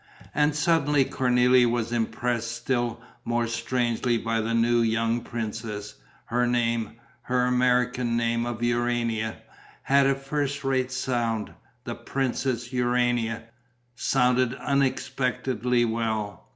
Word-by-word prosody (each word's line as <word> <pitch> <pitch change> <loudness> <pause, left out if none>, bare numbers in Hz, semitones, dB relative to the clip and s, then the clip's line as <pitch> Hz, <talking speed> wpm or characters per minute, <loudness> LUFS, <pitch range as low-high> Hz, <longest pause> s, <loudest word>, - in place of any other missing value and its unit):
And 150 0 +2
suddenly 150 -3 +3
Cornélie 125 -1 +3
was 115 -1 -1
impressed 120 0 -1
still 120 -2 -2 0.2
more 120 0 0
strangely 120 +1 0
by 115 0 -1
the 115 +1 -1
new 120 +1 +3
young 115 +1 +1
princess. 110 -3 -5 0.3
Her 120 +1 +1
name 115 -2 0 0.3
her 125 0 +1
American 125 -1 +2
name 115 0 0
of 120 -1 -4
Urania 120 -2 0 0.5
had 140 0 +4
a 135 - +3
first 140 +1 -3
rate 130 -1 0
sound: 120 -4 -1 0.3
"the 120 -2 -4
Princess 130 -1 -2
Urania" 120 -2 +1 0.5
sounded 125 -1 +2
unexpectedly 125 -3 0
well. 110 -4 -3
120 Hz, 110 wpm, -26 LUFS, 115-125 Hz, 0.5 s, had